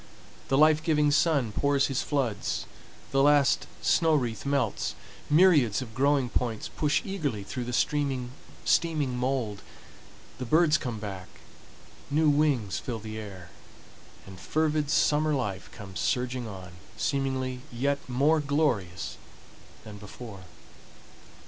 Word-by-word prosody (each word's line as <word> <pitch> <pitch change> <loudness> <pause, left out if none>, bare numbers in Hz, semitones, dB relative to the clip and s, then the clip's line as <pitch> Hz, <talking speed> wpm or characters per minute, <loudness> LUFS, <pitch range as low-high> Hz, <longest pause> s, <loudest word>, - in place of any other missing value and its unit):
The 135 - +2
life 155 +1 +5
giving 150 -2 +2
sun 145 -6 +2
pours 140 +4 +2
his 135 -2 -1
floods, 120 - -1 0.5
the 135 - +3
last 145 -1 +4 0.2
snow 160 -2 +3
wreath 120 -3 -2
melts, 140 -6 0 0.3
myriads 150 - +5
of 110 -3 -12
growing 140 +1 +2
points 120 -2 -2
push 150 +6 0
eagerly 150 - -3
through 120 +5 -5
the 130 0 0 0.3
steaming 150 -6 +1
mold, 125 -5 -2 0.8
the 130 - -3
birds 155 +4 +4
come 120 -5 -4
back, 95 -3 -6 0.8
new 155 +2 +3
wings 140 -9 +1
fill 120 -3 -4
the 110 0 -7
air, 95 -4 -9 0.7
and 95 -1 -11
fervid 155 +6 0
summer 150 0 +2
life 105 -8 -3
comes 95 -5 -8
surging 125 -1 -1
on, 95 -3 -9 0.3
seemingly 130 -2 -1
yet 140 +4 0
more 145 +6 +3
glorious 140 - -1 0.7
than 105 -2 -10
before. 105 -2 -10
130 Hz, 125 wpm, -28 LUFS, 110-150 Hz, 0.8 s, life